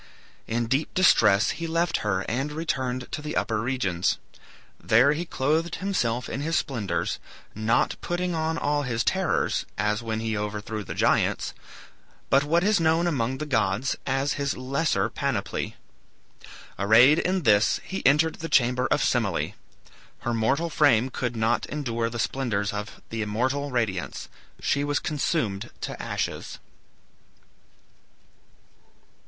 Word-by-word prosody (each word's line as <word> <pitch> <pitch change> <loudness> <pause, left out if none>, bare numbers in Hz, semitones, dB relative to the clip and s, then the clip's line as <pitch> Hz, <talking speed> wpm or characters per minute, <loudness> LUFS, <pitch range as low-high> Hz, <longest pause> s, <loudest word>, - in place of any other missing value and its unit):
In 115 +1 0
deep 135 +6 -1
distress 110 - +5
he 165 +1 -4
left 170 +1 +1
her 100 -3 -1
and 135 +8 -2
returned 130 -6 -3
to 150 - -4
the 150 +1 -5
upper 110 -3 0
regions. 110 -8 0 0.7
There 125 +6 +5
he 165 +3 -3
clothed 160 +3 0
himself 125 -11 -1
in 135 - -4
his 165 +3 -1
splendors, 105 - -2 0.3
not 110 +2 +1
putting 175 0 -2
on 160 0 -1
all 145 -1 0
his 120 -4 -1
terrors, 190 -2 +1
as 105 +1 0
when 110 -1 -3
he 110 -1 -2
overthrew 105 +1 -4
the - - -7
giants, - - +1 0.8
but 135 +1 +5
what 165 +4 +2
is 210 0 +3
known 165 +1 +3
among 130 -6 0
the 155 - -4
gods 110 -2 0
as 135 +1 +1
his 140 0 -1
lesser 140 +5 0
panoply. - - -3 1.0
Arrayed 120 +10 +6
in 185 -1 0
this, 105 -3 +4
he 190 - -5
entered 150 +4 +3
the 165 - -6
chamber 125 -2 +3
of - - +2
Semele. - - 0 0.7
Her 120 - -1
mortal 135 +9 +1
frame 130 -6 +3
could 120 -1 -3
not 115 +1 +1
endure 115 -6 -2
the 120 - -6
splendors 110 -5 -1
of 105 0 -6
the 115 -1 -2
immortal 130 +7 -1
radiance. 95 - -2 0.3
She 140 - 0
was 145 0 0
consumed 135 - -1
to - - -5
ashes. - - -3
130 Hz, 140 wpm, -26 LUFS, 110-155 Hz, 1.0 s, Arrayed